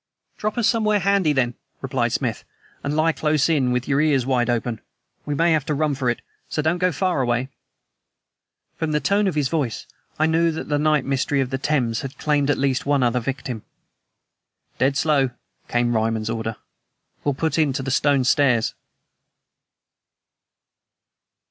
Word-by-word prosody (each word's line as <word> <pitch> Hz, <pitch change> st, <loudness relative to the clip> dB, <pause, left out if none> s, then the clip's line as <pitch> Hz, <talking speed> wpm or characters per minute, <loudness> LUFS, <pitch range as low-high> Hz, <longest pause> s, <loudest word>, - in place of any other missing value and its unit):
"Drop 215 Hz, +2 st, -3 dB
us 235 Hz, -3 st, +3 dB
somewhere 215 Hz, -2 st, +2 dB
handy, 195 Hz, -4 st, +2 dB
then," 130 Hz, -4 st, +1 dB, 0.3 s
replied -, -, -1 dB
Smith, -, -, -2 dB, 0.4 s
"and 145 Hz, +1 st, -1 dB
lie 160 Hz, +1 st, +3 dB
close 155 Hz, -2 st, +1 dB
in, 140 Hz, -6 st, +2 dB
with 125 Hz, +1 st, -1 dB
your 140 Hz, 0 st, +2 dB
ears 145 Hz, -5 st, +2 dB
wide 125 Hz, -2 st, +1 dB
open. 120 Hz, -1 st, -1 dB, 0.5 s
We 145 Hz, -, -1 dB
may 170 Hz, +3 st, +3 dB
have 155 Hz, -3 st, +2 dB
to 150 Hz, -, 0 dB
run 150 Hz, 0 st, +1 dB
for 130 Hz, -2 st, -1 dB
it, 120 Hz, -, -2 dB, 0.3 s
so 150 Hz, -, -1 dB
don't 165 Hz, +3 st, +1 dB
go 180 Hz, 0 st, +2 dB
far 175 Hz, -1 st, 0 dB
away." 120 Hz, +1 st, 0 dB, 1.3 s
From 160 Hz, -1 st, -2 dB
the 150 Hz, -, +2 dB
tone 200 Hz, +5 st, +2 dB
of 185 Hz, -, -1 dB
his 145 Hz, -3 st, +1 dB
voice 130 Hz, -8 st, -2 dB, 0.3 s
I 155 Hz, -, +3 dB
knew 165 Hz, +1 st, +3 dB
that 155 Hz, -, -6 dB
the 145 Hz, -1 st, +1 dB
night 150 Hz, -2 st, +2 dB
mystery 135 Hz, +1 st, 0 dB
of 130 Hz, -1 st, -1 dB
the 135 Hz, -, -2 dB
Thames 130 Hz, -6 st, 0 dB
had 135 Hz, +1 st, -7 dB
claimed 145 Hz, -2 st, +1 dB
at 145 Hz, -, +2 dB
least 135 Hz, -2 st, 0 dB
one 140 Hz, -2 st, +2 dB
other 125 Hz, +1 st, +2 dB
victim. 130 Hz, -2 st, -4 dB, 1.2 s
"Dead 135 Hz, +2 st, +2 dB
slow," 140 Hz, -4 st, +2 dB, 0.4 s
came 120 Hz, 0 st, +1 dB
Ryman's 110 Hz, 0 st, 0 dB
order. 115 Hz, -1 st, -3 dB, 0.7 s
"We'll 145 Hz, -2 st, 0 dB
put 160 Hz, +2 st, -1 dB
in 150 Hz, -3 st, +3 dB
to 135 Hz, 0 st, -3 dB
the 135 Hz, -, -3 dB
Stone 140 Hz, 0 st, +3 dB
Stairs." 125 Hz, -3 st, +2 dB
140 Hz, 175 wpm, -22 LUFS, 125-155 Hz, 1.3 s, us